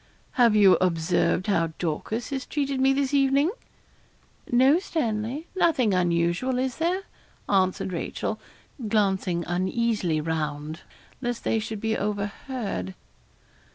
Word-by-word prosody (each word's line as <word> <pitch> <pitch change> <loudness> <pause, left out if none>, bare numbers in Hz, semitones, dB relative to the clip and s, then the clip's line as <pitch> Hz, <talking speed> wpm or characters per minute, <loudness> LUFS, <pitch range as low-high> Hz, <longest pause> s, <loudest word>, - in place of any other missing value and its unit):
'Have 235 -4 +4
you 200 -3 +7
observed 175 +1 +1
how 165 -6 +1
Dorcas 210 - -3
has 270 -2 -3
treated 275 -2 -1
me 265 0 +5
this 275 0 0
evening?' 280 +3 +3 1.0
'No, 260 +7 +5
Stanley; 255 - -2
nothing 275 - +3
unusual, 175 +7 +1
is 255 0 -1
there?' 355 +4 0 0.4
answered 185 -1 +1
Rachel, 170 - -3 0.5
glancing 190 -5 +1
uneasily 185 -1 0
round, 155 0 -3 0.4
lest 240 -2 -3
they 225 - +1
should 220 -1 -5
be 225 0 0
overheard. 205 - -3
215 Hz, 115 wpm, -26 LUFS, 175-260 Hz, 1.0 s, you